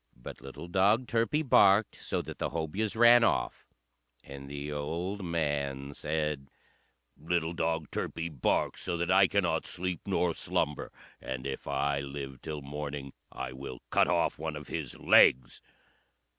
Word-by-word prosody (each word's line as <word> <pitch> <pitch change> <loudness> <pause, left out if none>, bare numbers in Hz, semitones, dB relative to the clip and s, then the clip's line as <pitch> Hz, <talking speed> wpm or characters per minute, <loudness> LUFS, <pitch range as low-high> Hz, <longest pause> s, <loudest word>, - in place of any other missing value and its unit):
But - - -10
little 70 +5 -9
dog 100 +7 +3
Turpie 120 +6 0
barked 100 -2 +5
so - - -2
that - - -9
the - - -1
Hobyahs 95 +7 -2
ran 120 +1 +7
off; - - 0 0.6
and 70 0 -10
the 70 +1 -5
old 85 +7 -3
man 70 -5 -2
said, 75 -3 -2 0.7
"Little 85 +2 -1
dog 80 -2 -1
Turpie 80 - -3
barks 70 -6 0
so 85 -2 -2
that 85 +1 0
I 95 +1 +6
cannot 100 -3 0
sleep 90 -2 -3
nor 90 -3 +1
slumber, 75 -1 -2 0.3
and 65 0 -5
if 70 -1 -5
I 70 0 0
live 70 -1 -6
till 75 -2 -6
morning 70 -1 -6 0.2
I - - -5
will 65 -1 -8
cut - - +4
off - - +1
one 80 0 -3
of 75 0 -8
his - - -4
legs." 60 -1 +5
80 Hz, 150 wpm, -30 LUFS, 70-90 Hz, 0.7 s, ran